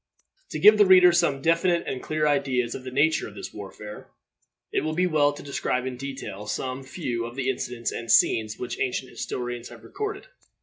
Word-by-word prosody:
To - - -4
give 210 +1 +7
the 205 - +7
reader 180 -1 +8
some 160 -6 +1
definite 170 +1 +2
and 130 - -4
clear 155 -1 0
ideas 130 -4 +1
of 130 - -7
the 130 - -6
nature 145 +5 +2
of 105 - -12
this 95 -2 -8
warfare, 105 +1 -9 0.6
it - - +1
will 155 +1 -2
be 180 +2 +2
well 150 -4 +3
to 145 - -10
describe 130 -2 -2
in 130 -1 -4
detail 125 -6 -7
some 130 +4 -3
few 130 -4 -4
of 120 +1 -8
the 135 -1 0
incidents 120 -2 -4
and 115 -1 -4
scenes 110 -2 +3
which 125 - -5
ancient 130 0 -2
historians 120 -1 -5
have - - -13
recorded. 420 +3 -5
135 Hz, 200 wpm, -25 LUFS, 120-155 Hz, 0.6 s, reader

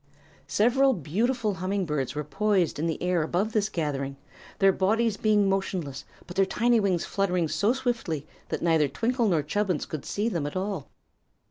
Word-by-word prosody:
Several 260 +4 +3
beautiful 215 - 0
humming 185 +1 -2
birds 145 -4 -2
were 150 - -2
poised 190 0 +1
in 165 - 0
the 160 - -2
air 180 -2 +2
above 180 +7 0
this 215 -2 +1
gathering, 140 -4 -3 0.4
their 195 0 +5
bodies 215 +4 +1
being 210 -1 +3
motionless 185 -8 -2 0.2
but 175 - -10
their 195 - +4
tiny 235 +3 +3
wings 190 -5 +1
fluttering 180 -4 0
so 195 +9 +1
swiftly 235 - -2 0.2
that - - -3
neither 160 -3 +3
Twinkle 230 - 0
nor 165 -6 +2
Chubbins 180 +1 -1
could 155 -3 -6
see 210 +2 -1
them 170 -10 -1
at 145 - -7
all. 185 -5 -3
190 Hz, 170 wpm, -27 LUFS, 155-215 Hz, 0.4 s, their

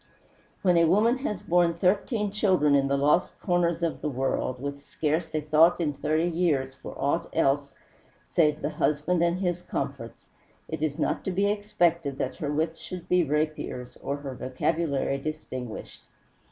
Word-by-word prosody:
When 180 -3 +4
a 170 - +5
woman 220 +9 +3
has 210 -8 -3
borne 170 -1 +3
thirteen 205 +4 +1
children 185 -8 +3
in 135 -1 +4
the 140 0 +1
lost 150 +6 +2
corners 175 -2 +1
of 165 - -1
the 150 - -1
world, 130 -1 -1
with 140 +1 -5
scarce 160 +2 -2
a 155 - +1
thought 155 +4 +4
in 155 -4 0
thirty 155 +4 0
years 160 -6 0
for - - -10
aught 165 +5 0
else 140 -2 +1 0.5
save 150 -2 +2
the 150 - -1
husband 155 +4 +1
and 170 +1 +2
his 175 -2 -1
comforts, - - -5 0.4
it - - -5
is 155 -2 -1
not - - -1
to 190 - 0
be 195 +2 +1
expected 175 -9 0
that - - -3
her 150 -5 -2
wits 160 +2 -1
should 180 -2 -8
be 180 -1 +4
rapiers 150 -5 -2
or 140 - -3
her 140 -2 -6
vocabulary 140 +2 -1
distinguished. 130 -5 -6
160 Hz, 165 wpm, -27 LUFS, 140-175 Hz, 0.5 s, a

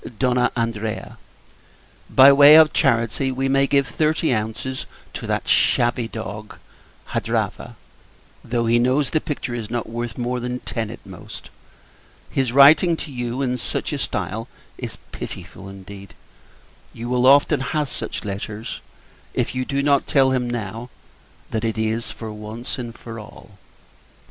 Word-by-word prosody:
Andrea. 115 -2 -3 0.9
By 135 +1 +8
way 145 +2 +9
of 155 -1 +7
charity, 130 -1 +1
we 135 +1 -1
may 135 +1 +3
give 140 -1 +3
thirty 155 0 +1
ounces 110 +4 -3 0.3
to - - -6
that - - -2
shabby 120 0 +2
dog, 105 -1 -7 0.5
Hadrava; - - -2 0.7
though 115 0 -1
he 115 +1 +3
knows 130 +3 +2
the 155 - +1
picture 150 -5 -4
is 115 -3 -5
not 120 -1 -3
worth 115 0 -5
more 125 0 -2
than 125 +1 -3
ten 115 -3 -3
at 115 - -10
most. 95 -3 -11 0.8
His 130 -3 0
writing 150 +6 +6
to 150 - -7
you 125 +1 -3
in 125 -1 -1
such - - -3
a - - -2
stile 110 +3 -3 0.3
is - - -6
pitiful 95 - -7
indeed. 100 0 -11 0.8
You 115 +1 -6
will 125 +1 +2
often 140 +1 +5
have 145 +2 -1
such 120 - -6
letters, 105 +2 -5 0.5
if - - 0
you 130 0 -2
do 140 +1 -1
not 140 -1 +2
tell 135 -2 +4
him, 125 -2 0
now, 115 +1 -5 0.6
that 110 0 -2
it 115 -1 -1
is 110 +1 -1
for 110 -2 -7
once 110 +4 -7
and 120 -1 -6
all. 110 -3 -10
120 Hz, 145 wpm, -22 LUFS, 110-135 Hz, 0.9 s, way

